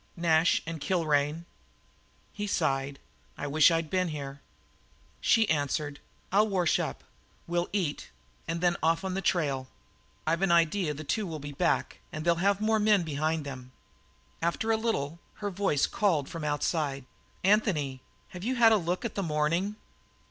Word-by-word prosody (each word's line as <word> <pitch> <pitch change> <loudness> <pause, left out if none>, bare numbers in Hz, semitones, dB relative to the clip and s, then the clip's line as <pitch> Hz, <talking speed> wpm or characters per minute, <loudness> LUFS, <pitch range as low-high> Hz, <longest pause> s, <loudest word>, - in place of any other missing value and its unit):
"Nash 165 -1 +3
and 165 -2 -5
Kilrain." 155 -1 +1 0.9
He 210 -1 -4
sighed: 135 -6 0 0.4
"I - - -4
wish 150 +3 +5
I'd 165 -2 -1
been 185 -1 +1
here." 140 -3 -6 0.8
She 225 -2 +4
answered: 145 -2 -1 0.3
"I'll 210 +3 +4
wash 185 -5 +2
up; - - -4 0.4
we'll 175 +1 -1
eat; 180 -8 -2 0.4
and 165 +1 -2
then 175 -1 +2
off 165 +3 +2
on 190 - -2
the 195 - -2
trail. 140 -8 0 0.6
I've 165 +2 +1
an 195 -2 +3
idea 170 -1 +2
that - - -11
the 155 - -6
two 205 +7 -1
will 160 -2 -4
be 145 0 -7
back, 140 - 0
and 155 +1 -5
they'll 170 0 +4
have 200 0 +3
more 220 +1 +2
men 210 -3 +4
behind 155 0 -1
them." 130 -2 -8 0.7
After 170 +7 0
a - - +4
little 170 -9 -2 0.2
her 205 -1 -4
voice 190 -7 +1
called 165 -10 +1
from 165 -2 -6
the 150 - -2
outside: 145 -2 -1 0.4
"Anthony, 175 -10 +2 0.3
have 180 0 -9
you 255 +4 0
had 230 -2 +6
a 220 - +6
look 180 +3 -2
at 230 - -3
the 200 - -2
morning?" 170 +5 0
165 Hz, 170 wpm, -29 LUFS, 150-195 Hz, 0.9 s, had